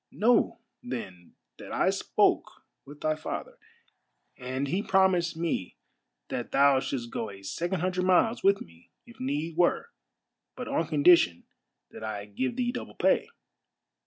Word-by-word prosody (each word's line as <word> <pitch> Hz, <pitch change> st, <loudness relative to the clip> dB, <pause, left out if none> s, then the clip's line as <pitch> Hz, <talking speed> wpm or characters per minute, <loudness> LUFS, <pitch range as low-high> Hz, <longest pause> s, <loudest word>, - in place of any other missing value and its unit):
Know, 230 Hz, +2 st, +2 dB, 0.2 s
then, 95 Hz, -, -7 dB, 0.2 s
that -, -, -9 dB
I -, -, +2 dB
spoke -, -, +1 dB, 0.2 s
with 145 Hz, +1 st, -13 dB
thy 155 Hz, 0 st, +1 dB
father, 485 Hz, -, -6 dB, 0.8 s
and 130 Hz, +2 st, -3 dB
he 185 Hz, +8 st, 0 dB
promised 185 Hz, -5 st, +2 dB
me 165 Hz, -, -2 dB, 0.5 s
that 120 Hz, -, -4 dB
thou 140 Hz, -1 st, +5 dB
shouldst 120 Hz, -3 st, -4 dB
go 110 Hz, -, -3 dB
a 100 Hz, -1 st, -12 dB
second 175 Hz, -, -2 dB
hun 185 Hz, +1 st, +1 dB
dred 180 Hz, 0 st, -1 dB
miles 225 Hz, +6 st, +3 dB
with 195 Hz, 0 st, +4 dB
me 85 Hz, 0 st, -14 dB, 0.2 s
if 235 Hz, -1 st, -16 dB
need 150 Hz, +5 st, -3 dB
were, 180 Hz, -, +2 dB, 0.7 s
but 250 Hz, -, -6 dB
on 165 Hz, -, 0 dB
condition 150 Hz, -, +4 dB, 0.5 s
that -, -, -10 dB
I 105 Hz, -2 st, -4 dB
give 115 Hz, -, -3 dB
thee 245 Hz, -1 st, 0 dB
double 250 Hz, -, -7 dB
pay. 445 Hz, -, +2 dB
160 Hz, 150 wpm, -28 LUFS, 125-190 Hz, 0.8 s, thou